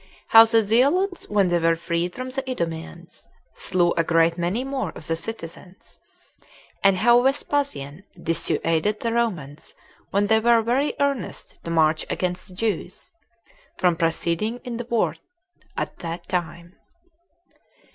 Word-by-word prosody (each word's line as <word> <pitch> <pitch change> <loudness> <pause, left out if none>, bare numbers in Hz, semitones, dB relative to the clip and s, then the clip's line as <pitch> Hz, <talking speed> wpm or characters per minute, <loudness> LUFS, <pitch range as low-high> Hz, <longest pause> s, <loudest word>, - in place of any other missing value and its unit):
How 225 0 +9
The 225 -1 +3
Zealots 295 - +2
When 200 -3 +2
They 175 0 +2
Were 165 0 +3
Freed 170 +1 -2
From 255 0 -5
The 270 +1 -2
Idumeans, 165 - -5 0.3
Slew 175 -1 +1
A 165 - +2
Great 165 0 +3
Many 180 +8 -1
More 270 0 -3
Of - - -8
The 165 - -1
Citizens; 180 -1 -9 0.8
And 195 -1 +5
How 240 +5 +5
Vespasian 270 - -1 0.2
Dissuaded 165 +4 0
The 230 -1 -1
Romans 170 -12 -3 0.3
When 200 +1 +1
They 220 +2 +4
Were 230 0 +4
Very 255 +6 0
Earnest 280 -3 -2
To - - -4
March 160 -1 +2
Against 180 +1 -2
The 185 - -13
Jews 205 - -3 0.7
From 180 -2 +2
Proceeding 170 +7 -1
In 245 -3 -5
The 240 - -5
War 235 -1 0 0.6
At - - -4
That 170 0 -6
Time. 170 -1 -4
190 Hz, 140 wpm, -23 LUFS, 165-235 Hz, 0.8 s, How